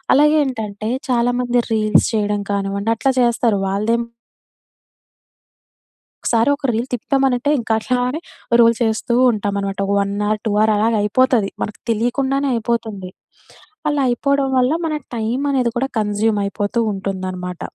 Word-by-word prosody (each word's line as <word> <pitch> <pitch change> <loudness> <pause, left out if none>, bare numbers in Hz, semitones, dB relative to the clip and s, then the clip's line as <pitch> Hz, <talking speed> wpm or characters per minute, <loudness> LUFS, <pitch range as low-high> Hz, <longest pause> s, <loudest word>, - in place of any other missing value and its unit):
అలాగే 300 +2 +5
ఏంటంటే 215 -4 -4 0.2
చాలా 245 0 +2
మంది 245 0 +1
రీల్స్ 215 -1 +3
చేయడం 210 -1 0
కానివ్వండి 200 +2 -1
అట్లా 270 - +2
చేస్తారు. 235 -3 +2
వాళ్ళదేం 215 +5 0 2.2
ఒకసారి, 230 +1 +2
ఒక - - -24
రీల్ 230 +3 -2
తిప్పుతమనంటే 265 +2 +1
ఇంకా 230 -2 -2
అట్లానే 250 +5 -1 0.4
రోల్ 230 0 +6
చేస్తూ 225 +1 0 0.2
ఉంటామన్నమాట. 200 -2 -2 0.2
1 200 0 0
హావర్, 215 0 0
2 - - +1
హావర్ 215 +1 +4
అలాగా 220 +2 +2
అయిపోతది. 225 -1 +2
మనకు 210 - -5
తెలియకుండానే 265 +5 0
అయిపోతుంది. 220 -5 -3 0.8
అలా 290 - 0
అయిపోవడం 280 +2 +1
వల్ల 255 +2 +3
మన 310 - -2 0.2
టైమనేది 250 +3 0
కూడా 265 - 0
కన్సుమ్ 210 +1 0
అయిపోతూ 205 +3 -2
ఉంటుందన్నమాట. 185 -2 -5
225 Hz, 125 wpm, -19 LUFS, 205-250 Hz, 2.2 s, రోల్